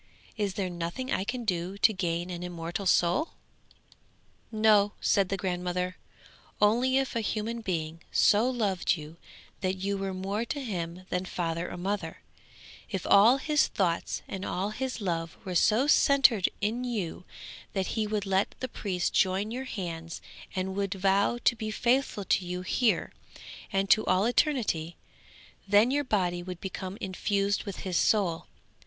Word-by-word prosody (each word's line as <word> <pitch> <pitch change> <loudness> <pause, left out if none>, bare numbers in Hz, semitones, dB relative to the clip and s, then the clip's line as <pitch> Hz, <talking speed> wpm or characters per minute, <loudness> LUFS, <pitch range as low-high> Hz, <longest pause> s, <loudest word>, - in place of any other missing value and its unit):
Is 205 -3 -2
there 195 -3 -1
nothing 175 +9 -4
I - - +1
can 245 +3 -4
do 180 0 -2
to 220 - +4
gain 175 -2 -2
an 175 -1 -5
immortal 175 +2 -4
soul?' 175 - +2 1.2
'No,' 215 -2 +4
said 195 -3 +2
the 195 - -1
grandmother; 180 -1 -2 0.6
'only 245 +5 +3
if 270 -2 -1
a 230 - +1
human 225 +2 -2
being 165 -5 -3
so 220 +5 +4
loved 205 -8 0
you 155 +2 -10 0.4
that 185 0 -1
you 200 +1 -2
were 195 -1 -3
more 195 +4 -2
to 285 +5 -4
him 180 -7 -4
than 180 +1 -1
father 170 -1 -2
or - - -6
mother, 185 -2 -3 0.7
if 190 -3 -3
all 220 +6 +6
his 300 +1 +2
thoughts 175 -4 -1
and 190 0 -5
all 195 +2 -2
his 255 +1 -4
love 165 -4 -2
were 185 - -4
so 215 +8 +4
centred 275 -8 +5
in 225 +5 -1
you 210 -9 -3 0.5
that 190 -2 -1
he 220 -2 0
would 210 -1 -2
let 195 +1 +1
the 255 - -3
priest 190 -6 -2
join 195 +3 +2
your 255 +3 -4
hands 165 -8 -5 0.4
and 190 0 -2
would 200 -1 -1
vow 195 +4 +2
to - - +4
be 220 -1 -4
faithful 240 -1 +1
to 185 - +2
you 180 +1 -4
here, 230 +4 +1 0.6
and 195 0 +1
to 215 - +6
all 185 +2 +3
eternity; 230 - +1 0.7
then 205 +5 +5
your 290 +1 +1
body 180 -8 0
would 180 0 -7
become 190 +1 -5
infused 200 +1 0
with 200 -3 -6
his 185 -3 -1
soul. 185 -7 +2
195 Hz, 160 wpm, -28 LUFS, 180-220 Hz, 1.2 s, all